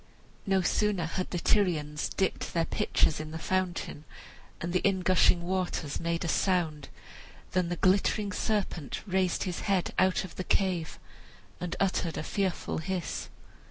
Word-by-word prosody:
No 190 -1 +3
sooner 205 -3 +1
had 185 +3 -3
the 180 - -2
Tyrians 165 -7 +1
dipped 190 -2 -1
their 165 -1 +3
pitchers 155 - +1
in 155 0 -5
the 160 - -5
fountain, 175 -3 -2 0.6
and 170 +1 -3
the 185 - +3
in 190 -1 +2
gushing 180 -1 +4
waters 180 -5 -2
made 170 0 -1
a - - -1
sound, 165 -6 +1 0.6
than 180 -2 +1
the 175 - -1
glittering 200 +3 +2
serpent 200 -9 -2
raised 190 -3 +1
his 180 -2 -3
head 190 -3 +1
out 185 0 +3
of 185 - -10
the 185 - -2
cave 180 -4 0 0.6
and 180 -1 -3
uttered 180 -3 0
a - - -2
fearful 190 -1 -1
hiss. 180 +1 -3
180 Hz, 155 wpm, -29 LUFS, 165-190 Hz, 0.6 s, gushing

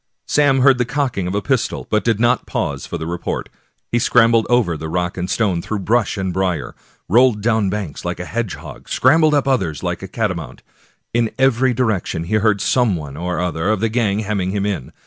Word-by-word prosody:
Sam 145 -3 +3
heard 130 -1 +5
the - - +3
cocking 130 -8 -1
of 90 - -3
a 100 - -1
pistol, 130 -4 -1
but 105 - +2
did 115 -3 +1
not 120 +1 +2
pause - - -3
for 85 - -4
the 80 - -5
report. 85 +1 -4 0.4
He 120 - +2
scrambled 115 -1 +4
over 120 -9 +2
rock 85 +3 -3
and 90 0 -4
stone, 95 -7 0
through 110 - -3
brush 110 +1 +1
and 95 -2 -2
brier, 95 -2 -1 0.3
rolled 120 +1 +4
down 110 -3 +2
banks 95 -6 -4
like 90 0 -3
a 90 - -4
hedgehog, 115 -3 -6
scram 145 +6 +4
bled 155 -1 +4
up 140 -1 +1
others 85 - 0
like - - -2
a - - -6
catamount. - - -4 0.5
In 115 -1 +2
every 130 -1 +3
direction 110 -9 -1
he 85 - -5
heard 105 -1 +2
some 120 -7 +2
one 75 -4 -7
or 90 +3 -3
other 90 +1 -1
of 110 -2 +1
the 115 +2 0
gang 110 -3 0
hemming 100 -3 -2
him 100 +1 -1
in. 95 -11 -3
105 Hz, 205 wpm, -19 LUFS, 90-120 Hz, 0.5 s, heard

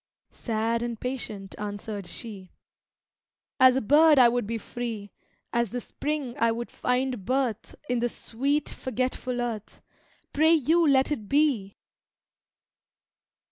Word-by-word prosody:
Sad 230 0 -1
and 235 -2 -4
patient 215 -6 -5
answered 205 -1 -5
she, 195 -4 -8 1.1
"As 260 -1 +7
a 265 - +1
bird 300 +6 +6
I 245 -2 +8
would 240 -3 -1
be 230 +1 -2
free; 225 -3 -6 0.4
As 235 -2 +1
the 245 - -3
spring 285 -1 -4
I 230 0 +3
would 235 +1 -4
find 250 -3 -1
birth 250 -2 -1
In 245 -1 0
the 240 +1 0
sweet, 275 +7 -1
forgetful 255 -1 -3
earth 230 -4 -5 0.5
Pray 315 +3 +5
you, 325 +3 +3
let 270 +1 +3
it 220 -9 -3
be!" 275 -10 +1
240 Hz, 130 wpm, -27 LUFS, 220-265 Hz, 1.1 s, I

